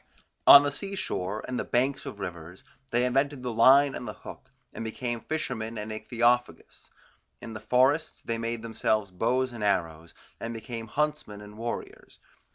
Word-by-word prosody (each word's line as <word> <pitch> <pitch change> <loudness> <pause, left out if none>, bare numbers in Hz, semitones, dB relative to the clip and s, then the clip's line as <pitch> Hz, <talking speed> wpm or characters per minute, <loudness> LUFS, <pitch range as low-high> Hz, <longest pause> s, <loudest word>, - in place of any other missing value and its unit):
On 140 - +11
the 145 - 0
sea 200 +7 -5
shore, 100 - -3
and 125 -1 -3
the - - -1
banks 135 +3 0
of 105 - -7
rivers, 85 -1 -7 0.3
they 120 +1 +2
invented 135 +1 0
the 125 -2 -3
line 135 +5 +6
and - - -6
the - - -5
hook, - - -10 0.2
and - - -6
became 120 +1 -4
fishermen 120 -8 -4
and 105 +1 -5
ichthyophagous. 120 +2 -1 0.5
In 115 - -8
the 110 - -6
forests 135 +8 +1
they 115 0 -3
made 115 0 -3
themselves 110 -3 0
bows 120 +7 0
and 115 -3 -6
arrows, 85 -5 -1 0.2
and 115 0 -5
became 115 0 -6
huntsmen 150 -5 -2
and 105 0 -12
warriors. 115 +2 -6
115 Hz, 165 wpm, -27 LUFS, 110-130 Hz, 0.5 s, On